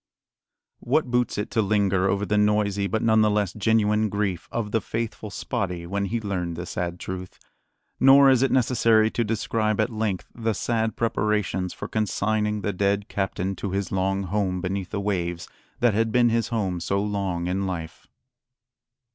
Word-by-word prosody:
What 130 0 0
boots 125 -1 +1
it 105 - -3
to 110 - +2
linger 100 -2 +2
over 100 +1 0
the 105 - 0
noisy, 105 -1 +2
but 110 +4 -1
none 110 -1 +4
the 105 - +4
less 105 -3 0
genuine 105 0 +2
grief, 100 -3 -2
of 110 -3 -3
the 115 - +1
faithful 110 -1 -4
Spottie 90 -3 -3
when 100 +3 -2
he 115 +4 -2
learned 90 -5 -3
the 85 +2 -5
sad 90 0 -4
truth? 90 -1 -6 0.6
Nor 135 +1 +7
is 130 -2 +3
it 135 - +3
necessary 115 -3 +3
to 120 - 0
describe 110 0 -1
at 110 +3 +1
length 110 -4 -2
the 115 -1 -1
sad 110 +2 -1
preparations 105 -5 0
for - - -7
consigning 105 0 0
the 100 0 -2
dead 100 +2 0
captain 95 -1 -2
to 95 0 -4
his 100 -2 -2
long 95 +1 0
home 95 -1 -1
beneath 95 0 -3
the 100 - -3
waves 90 -4 -2 0.3
that 120 -2 +4
had 115 +2 +1
been 120 0 +4
his 115 0 +1
home 100 -7 -1
so 100 +3 -1
long 100 -4 -2
in 95 +2 -1
life. 85 -3 -6
105 Hz, 175 wpm, -25 LUFS, 95-110 Hz, 0.6 s, Nor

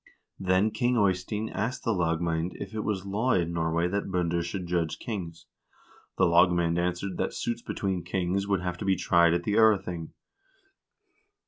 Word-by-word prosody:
" - - -48
Then 95 +4 +3
King 125 +1 +1
Eystein 100 +2 0
asked 115 +6 -3
the 115 - +1
lagmand 85 -1 0
if 100 0 -7
it 110 - -3
was 100 -3 -2
law 110 +6 0
in 85 -1 0
Norway 85 +1 0
that 100 +1 -2
binder 85 -2 0
should 90 +2 -4
judge 85 -2 -1
kings. 85 -7 -6 0.7
The - - +4
lagmand 85 0 +3
answered 90 +2 -2
that - - -2
suits 120 0 -2
between 95 -6 -3
kings 95 +1 -1
would 100 -3 +1
have 90 0 -4
to - - -4
be 95 -1 +3
tried 85 -1 +3
at 85 - -1
the 105 - -1
0rething." 100 -7 +2
90 Hz, 170 wpm, -28 LUFS, 85-100 Hz, 0.7 s, The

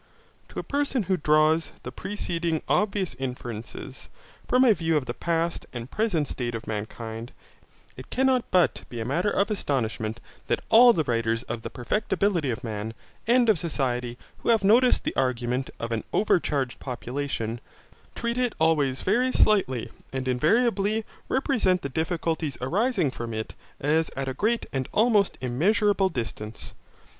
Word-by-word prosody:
To - - -12
a - - -3
person 280 -4 0
who 190 0 +1
draws 155 0 +3
the - - -6
preceding 170 -5 -2
obvious 200 -3 +1
inferences, 125 0 -6 0.4
from 255 +1 +4
a 230 - +7
view 165 -3 +1
of 140 - -1
the 120 - -3
past 165 +5 -1
and 120 +1 -6
present 190 -9 0
state 120 -2 -3
of 115 - -6
mankind, 110 +2 -5 0.6
it 130 - -11
cannot 260 -1 +2
but 180 -2 +2
be 120 - -6
a 110 - -3
matter 170 - +1
of 205 +1 +1
astonishment 115 - -2 0.3
that - - 0
all 240 +2 +8
the 165 -9 +1
writers 115 -2 0
on 120 - -3
the - - -5
perfectibility 180 - 0
of 120 +1 -3
man 110 0 -4 0.3
and 240 0 +4
of 215 -7 +4
society 125 -6 -2 0.2
who - - -3
have 225 -3 +4
noticed 240 +6 +5
the - - -2
argument 125 0 0
of 115 - -4
an 115 -1 -1
overcharged 145 - +1
population, 125 -3 -4 0.5
treat 235 +1 -2
it 245 -2 +1
always 150 -5 +2
very 245 +7 +2
slightly 165 - +2 0.2
and 130 -1 -3
invariably 210 - +2 0.2
represent 230 -9 +1
the 140 - -2
difficulties 160 -1 -1
arising 185 - +1
from 115 -2 -5
it 110 0 -4 0.3
as 160 +3 +2
at 135 0 -3
a 130 - -1
great 225 - 0
and 130 -2 -2
almost 215 -3 +3
immeasurable 195 - +2
distance. 115 - -6
155 Hz, 155 wpm, -26 LUFS, 125-205 Hz, 0.6 s, all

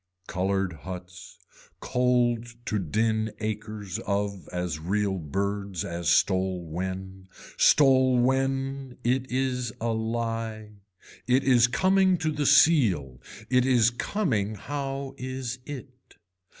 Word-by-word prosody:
Colored 95 0 -1
huts, 90 +2 -9 0.4
cold 120 -2 +1 0.2
to 105 -3 -1
din 110 +5 0
acres 105 -2 -4
of 100 -3 -3
as 90 -3 -3
real 95 +3 -1
birds 100 +3 -3
as 85 -1 -2
stole 95 -2 +2
when. 95 +3 -5 0.3
Stole 130 -3 +5
when, 135 +1 0
it 130 +2 0
is 125 -2 -1
a 115 0 -1
lie. 110 -1 -3 0.6
It 130 +2 +3
is 125 -3 +5
coming 190 +6 +3
to 160 -1 -1
the 150 -1 -1
seal, 110 - +4 0.3
it 125 0 +3
is 125 -2 +4
coming 120 - -1
how 135 +3 -4
is 130 -1 -4
it. 130 -3 -10
115 Hz, 110 wpm, -27 LUFS, 95-130 Hz, 0.6 s, Stole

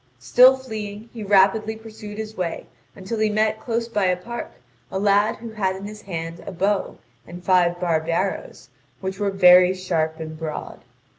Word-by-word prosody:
Still 250 - +6
fleeing, 220 -3 -7
he 230 - -8
rapidly 205 +2 +3
pursued 215 -1 -10
his 220 0 -6
way 175 -4 -3 0.3
until 200 +3 -5
he 215 0 +2
met 215 +1 +1
close 230 0 -2
by 210 -4 0
a 180 -1 +2
park 235 +6 -7 0.4
a - - -2
lad 205 +2 +3
who 230 0 -9
had 195 -3 -1
in 195 +1 -8
his 210 +1 -8
hand 165 -3 -6
a - - -4
bow 195 +2 -1 0.3
and 175 +1 -10
five 175 -2 +3
barbed 165 -2 0
arrows, 185 -7 -2 0.3
which 190 0 -5
were 205 -1 +1
very 180 -1 +6
sharp 165 -4 -1
and 155 -1 -7
broad. 155 -2 -6
195 Hz, 175 wpm, -23 LUFS, 180-215 Hz, 0.4 s, Still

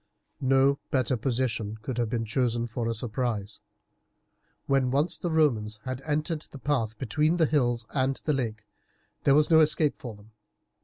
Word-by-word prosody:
No 135 +1 +3
better 130 -1 +1
position 115 -3 -1
could 125 0 -3
have 120 -2 0
been 115 -1 -1
chosen 120 0 0
for 120 0 -3
a 115 - 0
surprise. 110 -3 -3 1.0
When 135 -2 +2
once 145 +6 +1
the 175 - -2
Romans 115 -10 +1
had 130 0 -4
entered 155 +2 -2
the - - -10
path 120 -6 -1
between 150 +8 +1
the 165 - +4
hills 120 -6 +1
and 135 -1 +1
the 150 - +2
lake 110 -5 -3 0.6
there 140 - +6
was 150 +2 +3
no 160 - +7
escape 155 -1 +2
for 120 -4 -8
them. 105 +2 -18
130 Hz, 165 wpm, -27 LUFS, 115-145 Hz, 1.0 s, no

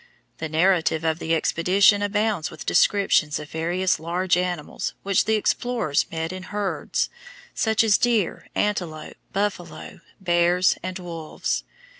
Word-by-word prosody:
The 160 - -4
narrative 165 -1 +2
of 160 0 0
the 165 0 0
expedition 190 +6 +3
abounds 205 -4 0
with 155 - -10
descriptions 195 -7 +3
of 150 0 -9
various 175 +2 0
large 175 +3 0
animals 180 -3 -3
which 195 -1 +2
the 220 - +2
explorers 215 -7 0
met 165 +1 -3
in 185 - -6
herds, 205 0 -2 0.4
such 220 0 +2
as 215 -2 +4
deer, 230 -7 0
antelope, 175 -7 -2
buffalo, 195 -4 -4 0.2
bears, 175 0 +3
and 185 0 -4
wolves. 170 -4 -4
180 Hz, 130 wpm, -24 LUFS, 165-200 Hz, 0.4 s, as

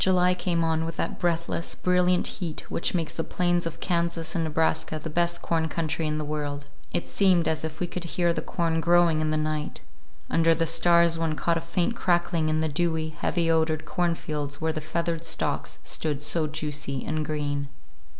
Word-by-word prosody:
XIX - - +4
JULY 180 -1 +4
came 175 -2 0
on 160 0 +1
with 165 0 -4
that - - -2
breathless, 170 -1 -1
brilliant 180 0 +2
heat 165 -4 -3
which 170 - 0
makes 165 -3 -1
the 165 - -2
plains 175 -1 +1
of 165 - -7
Kansas 170 -2 0
and 165 - 0
Nebraska 160 0 0
the 155 +1 -6
best 175 +1 +1
corn 160 -1 0
country 160 -1 -1
in 150 0 -1
the 155 - -3
world. 145 -1 -3 0.3
It - - -1
seemed 185 -4 +3
as 155 0 0
if 155 0 -5
we 180 - 0
could 175 0 -5
hear 170 0 +1
the - - -2
corn 165 -2 -1
growing 170 -1 +4
in 155 - 0
the 155 - +1
night; 155 0 -2 0.5
under 165 0 +3
the 165 +1 +1
stars 170 0 +4
one 160 -2 0
caught 165 +2 +1
a - - -10
faint 175 +6 -1
crackling 175 -5 +1
in 155 0 +1
the 160 - +1
dewy, 160 +1 0
heavy 170 +2 -1
odored 160 -1 +1
cornfields 150 -4 -2
where 160 0 0
the 155 - -3
feathered 165 +1 -2
stalks 165 - -1
stood 150 -2 0
so 155 +1 +1
juicy 150 -3 -3
and 155 0 -1
green. 145 -2 -2
165 Hz, 200 wpm, -26 LUFS, 155-170 Hz, 0.5 s, XIX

